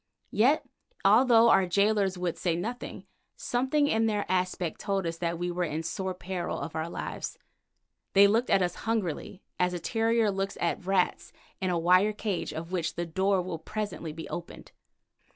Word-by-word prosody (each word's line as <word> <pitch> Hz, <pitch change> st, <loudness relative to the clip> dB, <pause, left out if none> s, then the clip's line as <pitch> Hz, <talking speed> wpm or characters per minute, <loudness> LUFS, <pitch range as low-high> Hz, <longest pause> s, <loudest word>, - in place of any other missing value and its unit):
Yet 270 Hz, +9 st, +3 dB, 0.4 s
although 230 Hz, +2 st, +6 dB
our 190 Hz, -, +4 dB
gaolers 200 Hz, 0 st, +2 dB
would 180 Hz, -2 st, -2 dB
say 175 Hz, -3 st, 0 dB
nothing, 230 Hz, +8 st, -5 dB, 0.3 s
something 285 Hz, -, +1 dB
in 225 Hz, -5 st, +2 dB
their 210 Hz, -2 st, 0 dB
aspect 185 Hz, -2 st, -1 dB
told 195 Hz, -3 st, -1 dB
us 165 Hz, 0 st, -3 dB
that 170 Hz, -1 st, -1 dB
we 175 Hz, +1 st, -2 dB
were 180 Hz, +1 st, -1 dB
in 160 Hz, -1 st, -2 dB
sore 190 Hz, +2 st, -3 dB
peril 180 Hz, -1 st, -4 dB
of 145 Hz, +3 st, -6 dB
our 160 Hz, +1 st, -2 dB
lives. -, -, -5 dB, 0.8 s
They 200 Hz, +1 st, +8 dB
looked 225 Hz, +5 st, +2 dB
at 195 Hz, -, +4 dB
us 175 Hz, -1 st, -1 dB, 0.2 s
hungrily, 195 Hz, -3 st, -2 dB, 0.2 s
as 180 Hz, 0 st, +1 dB
a -, -, -3 dB
terrier 225 Hz, +3 st, +1 dB
looks 195 Hz, 0 st, -3 dB
at 175 Hz, +1 st, -2 dB
rats 190 Hz, -2 st, +1 dB, 0.3 s
in 185 Hz, -, 0 dB
a 175 Hz, -, +1 dB
wire 185 Hz, +5 st, +4 dB
cage 205 Hz, -3 st, -3 dB
of 165 Hz, +2 st, -6 dB
which 170 Hz, -3 st, -2 dB
the 175 Hz, -, -2 dB
door 190 Hz, +3 st, +1 dB
will 175 Hz, -3 st, -5 dB
presently 205 Hz, -2 st, -4 dB
be 160 Hz, +1 st, -8 dB
opened. 170 Hz, -, -7 dB
185 Hz, 175 wpm, -28 LUFS, 175-215 Hz, 0.8 s, They